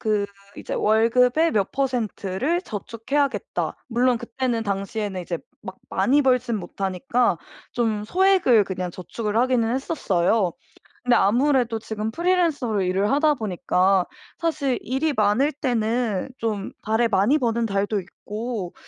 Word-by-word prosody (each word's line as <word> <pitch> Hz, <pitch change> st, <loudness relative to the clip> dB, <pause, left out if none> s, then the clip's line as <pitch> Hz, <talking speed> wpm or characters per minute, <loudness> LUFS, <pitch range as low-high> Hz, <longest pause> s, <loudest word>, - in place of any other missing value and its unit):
그 210 Hz, -2 st, +1 dB, 0.3 s
이제 -, -, -5 dB
월급의 250 Hz, +8 st, +3 dB
몇 200 Hz, -7 st, 0 dB
퍼센트를 260 Hz, -, -1 dB
저축해야겠다. 245 Hz, -, -2 dB
물론 245 Hz, +1 st, +2 dB
그때는 235 Hz, 0 st, -2 dB
당시에는 200 Hz, -1 st, -3 dB
이제 170 Hz, -1 st, -4 dB, 0.2 s
막 190 Hz, -2 st, -8 dB, 0.2 s
많이 260 Hz, +10 st, +3 dB
벌지는 250 Hz, -4 st, +1 dB
못하니까 195 Hz, +4 st, 0 dB, 0.4 s
좀 220 Hz, -3 st, 0 dB
소액을 365 Hz, -, +4 dB
그냥 185 Hz, -2 st, -4 dB
저축을 210 Hz, +5 st, -4 dB
하기는 245 Hz, -1 st, +2 dB
했었어요. 200 Hz, -, +1 dB, 0.5 s
근데 245 Hz, -1 st, +4 dB
아무래도 240 Hz, +2 st, +2 dB
지금 220 Hz, 0 st, -4 dB
프리랜서로 320 Hz, -, +1 dB
일을 190 Hz, +4 st, +1 dB
하다 295 Hz, +1 st, +3 dB
보니까 190 Hz, -3 st, +1 dB, 0.3 s
사실 280 Hz, -7 st, 0 dB
일이 275 Hz, +5 st, -1 dB
많을 220 Hz, +6 st, +2 dB
때는 235 Hz, -5 st, -1 dB
좀 210 Hz, -3 st, -2 dB
달에 220 Hz, +2 st, +1 dB
많이 220 Hz, +7 st, +3 dB
버는 235 Hz, -4 st, 0 dB
달도 200 Hz, +1 st, 0 dB
있고 210 Hz, +1 st, -6 dB
230 Hz, 295 characters per minute, -23 LUFS, 200-260 Hz, 0.5 s, 소액을